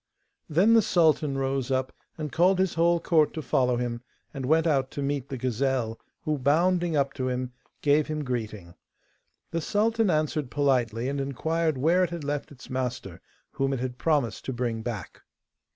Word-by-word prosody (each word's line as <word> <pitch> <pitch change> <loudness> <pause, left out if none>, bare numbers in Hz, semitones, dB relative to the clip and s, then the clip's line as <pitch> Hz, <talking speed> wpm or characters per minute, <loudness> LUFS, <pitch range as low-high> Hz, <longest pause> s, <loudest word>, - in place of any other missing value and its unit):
Then 185 +9 +4
the 225 - +7
sultan 160 -8 +2
rose 135 -1 -1
up, 130 -1 -1 0.2
and 155 -3 -4
called 180 +3 +3
his 190 -1 +1
whole 170 +1 +3
court 160 -3 +2
to 160 - -3
follow 125 -1 +2
him, 120 -1 -3 0.3
and 135 -3 -4
went 160 +2 +3
out 135 -5 +2
to 140 - -5
meet 140 -1 -2
the 135 - -4
gazelle, 125 -2 -1 0.2
who, 150 -2 -1
bounding 170 +5 +2
up 135 -1 +1
to 130 -2 -2
him, 125 0 -3 0.3
gave 150 +1 +3
him 155 -1 -3
greeting. 110 -8 -4 0.8
The 165 - -1
sultan 220 +4 +1
answered 155 -4 0
politely, 125 -4 +1
and 140 0 -1
inquired 160 +3 -1
where 170 +7 +3
it 180 - 0
had 170 -3 -6
left 145 0 -3
its 135 -2 -13
master, 125 -8 -4 0.3
whom 135 0 -1
it 135 - -2
had 125 0 -4
promised 140 -10 0
to 130 - -3
bring 120 -2 -2
back. 110 -5 -6
140 Hz, 180 wpm, -27 LUFS, 125-160 Hz, 0.8 s, the